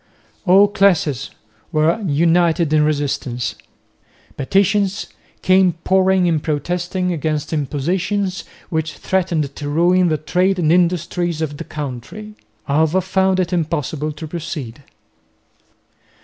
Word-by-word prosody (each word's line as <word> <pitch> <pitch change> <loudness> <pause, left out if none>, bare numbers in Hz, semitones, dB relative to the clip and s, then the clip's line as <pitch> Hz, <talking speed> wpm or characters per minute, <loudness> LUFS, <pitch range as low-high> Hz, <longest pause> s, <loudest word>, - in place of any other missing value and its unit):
All 195 +3 +7
classes 175 - +1 0.4
were 160 +4 +2
united 170 -1 +2
in 155 -1 +4
resistance. 140 -5 -1 0.8
Petitions 195 +6 +1 0.4
came 185 -1 +4
pouring 190 -1 +3
in 165 -3 +2
protesting 175 +5 -2
against 155 -1 -2
impositions 180 +7 -1 0.3
which 160 -2 -2
threatened 170 -6 -1
to 145 - -5
ruin 175 +4 +3
the 155 - +1
trade 185 +5 +1
and 160 -3 +2
industries 175 -1 0
of 150 -2 -3
the - - -5
country. 150 - -7 0.3
Alva 160 +5 +2
found 190 0 +1
it 180 0 -1
impossible 155 -2 -2
to 155 +2 -8
proceed. 150 -7 -6
170 Hz, 110 wpm, -19 LUFS, 150-185 Hz, 0.8 s, All